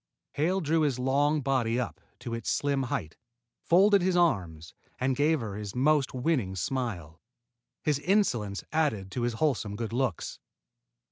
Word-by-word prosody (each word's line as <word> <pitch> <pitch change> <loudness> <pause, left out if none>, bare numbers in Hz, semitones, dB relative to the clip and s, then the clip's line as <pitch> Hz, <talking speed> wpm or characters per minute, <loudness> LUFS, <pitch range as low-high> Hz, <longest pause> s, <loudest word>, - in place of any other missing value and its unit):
Hale 180 +6 0
drew 160 0 +1
his 145 -5 +1
long 145 +4 +2
body 125 -3 +1
up 125 - -4 0.2
to 120 - -5
its 115 -2 -3
slim 140 -1 +1
height, 85 -10 -3 0.4
folded 195 +3 +5
his 180 0 +1
arms, 85 - 0 0.2
and 130 +1 0
gave 150 +1 +2
her 110 -3 -5
his 105 0 -6
most 140 +2 +2
winning 125 - -1
smile. 95 - -3 0.6
His 150 -2 +1
insolence 125 - +1
added 110 -12 0
to 125 - -3
his 120 0 0
wholesome 115 -6 0
good 115 +1 -4
looks. 125 -8 -2
130 Hz, 150 wpm, -28 LUFS, 110-155 Hz, 0.6 s, folded